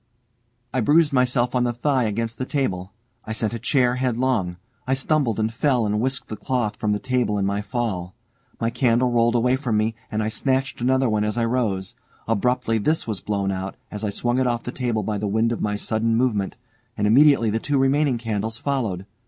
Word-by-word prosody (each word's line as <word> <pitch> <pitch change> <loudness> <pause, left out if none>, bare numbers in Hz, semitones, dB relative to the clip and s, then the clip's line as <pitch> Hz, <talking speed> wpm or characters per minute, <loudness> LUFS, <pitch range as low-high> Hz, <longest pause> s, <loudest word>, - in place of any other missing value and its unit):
I 130 - +1
bruised 150 +5 +4
myself 125 -1 +2
on 125 -1 +2
the 120 - +1
thigh 130 +1 +1
against 115 +2 -2
the 130 - -1
table, 95 - -2 0.3
I 110 - -5
sent 110 0 -2
a 115 - -3
chair 125 0 +2
headlong, 125 -8 0 0.3
I 130 - +2
stumbled 135 -5 +1
and 110 +1 0
fell 125 -1 +1
and 105 0 0
whisked 130 +2 -2
the 110 - -5
cloth 120 -2 -1
from 105 0 -1
the 105 - +2
table 125 -3 0
in 100 - 0
my 100 +1 0
fall. 105 -6 -3 0.4
My 115 0 0
candle 120 +1 +2
rolled 120 0 +3
away 125 +2 +3
from 125 -6 -1
me, 110 +1 +1 0.2
and 110 0 -1
I - - -1
snatched 135 +2 -1
another 130 +1 +2 0.2
as 105 +2 -2
I 115 - +2
rose. 110 -6 -1 0.3
Abruptly 115 +1 +1
this 155 +10 +1
was 110 -5 -3
blown 100 -1 -1
out, 95 0 -4 0.2
as 105 0 -5
I 105 - 0
swung 120 +5 0
it 130 - +2
off 120 -1 -1
the 125 - -4
table 120 -4 -1
by 105 +1 -2
the 105 - -2
wind 110 +3 +1
of 120 - -3
my 105 -1 0
sudden 110 +2 0
movement, 110 -6 0 0.4
and 105 - 0
immediately 125 0 +5
the 110 - 0
two 145 +4 0
remaining 135 0 +2
candles 110 -1 -3
followed. 115 -10 -2
115 Hz, 210 wpm, -23 LUFS, 105-130 Hz, 0.4 s, immediately